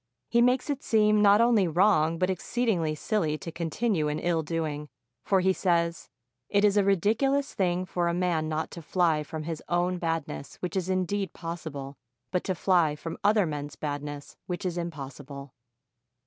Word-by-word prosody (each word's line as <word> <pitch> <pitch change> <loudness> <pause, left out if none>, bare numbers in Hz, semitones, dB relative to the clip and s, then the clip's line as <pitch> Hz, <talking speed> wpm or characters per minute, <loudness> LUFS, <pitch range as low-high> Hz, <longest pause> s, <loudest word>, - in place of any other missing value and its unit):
He 235 - +4
makes 250 +1 +3
it 280 -1 -3
seem 210 -1 +3
not 205 +1 +6
only 230 -5 +4
wrong, 165 -2 +3
but 185 +2 +1
exceedingly 185 -6 0
silly 155 -2 -1
to 165 - -7
continue 170 +1 -1
in 150 0 -1
ill 170 -1 0
doing, 155 -2 -3 0.3
for 195 -2 +2
he 190 +1 +3
says, 170 -3 0 0.4
"It 205 +1 +3
is 205 -1 +3
a 205 - +4
ridiculous 225 +9 +2
thing 180 -1 0
for 175 -1 -1
a 170 - +1
man 170 -3 0
not 155 0 -2
to 170 - -8
fly 165 -1 +1
from 155 +1 -6
his 160 0 -4
own 175 +1 +1
badness, 165 -4 -3
v/hich 180 0 -5
is 185 -1 -1
indeed 185 0 -1
possible, 155 -5 -6 0.3
but 180 - 0
to 185 - -1
fly 170 -4 +2
from 165 +2 -7
other 205 -1 +4
men's 145 -2 -5
badness, 145 -1 -5
which 180 +1 -4
is 180 -2 -1
impossible." 140 -4 -7
175 Hz, 175 wpm, -28 LUFS, 155-195 Hz, 0.4 s, not